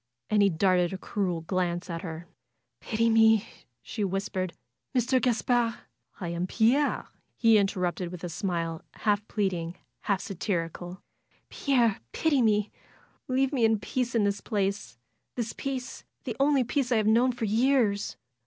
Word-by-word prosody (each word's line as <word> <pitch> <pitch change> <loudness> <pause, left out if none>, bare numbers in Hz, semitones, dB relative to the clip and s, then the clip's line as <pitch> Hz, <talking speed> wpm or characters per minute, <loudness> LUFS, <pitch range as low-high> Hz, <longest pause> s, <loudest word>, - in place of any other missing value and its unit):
And 210 -1 +4
he 200 - +5
darted 180 0 +2
a - - -3
cruel 185 -4 -2
glance 175 0 -1
at 165 -2 -4
her. 165 -2 -6 0.5
"Pity 230 0 0
me!" 225 -1 +5 0.4
she 210 - -4
whispered. 190 -1 -2 0.4
"Mr. 255 +1 +2
Gaspard 235 0 +1 0.2
" - - -31
"I 175 -4 -4
am 170 +2 -2
Pierre!" 245 +9 +2 0.3
he 225 -2 +5
interrupted, 180 -3 -1
with 180 -1 -8
a - - -2
smile 165 -2 -2
half 210 0 0
pleading, 180 -5 -1 0.2
half 200 -3 0
satirical. 180 -2 -4 0.5
"Pierre, 240 -7 +2
pity 300 -5 +2
me! 210 -2 +2 0.6
Leave 265 +2 +1
me 250 -4 +1
in 225 0 +4
peace 245 +4 -2
in 225 - +3
this 200 0 0
place. 195 - -2 0.4
This 235 -2 -3
peace, 265 -2 -5 0.2
the - - -4
only 275 -1 +4
peace 255 +1 -1
I 235 - +4
have 215 - +1
known 235 +4 +4
for 235 -2 -3
years! 220 -2 +2
210 Hz, 155 wpm, -28 LUFS, 185-235 Hz, 0.6 s, he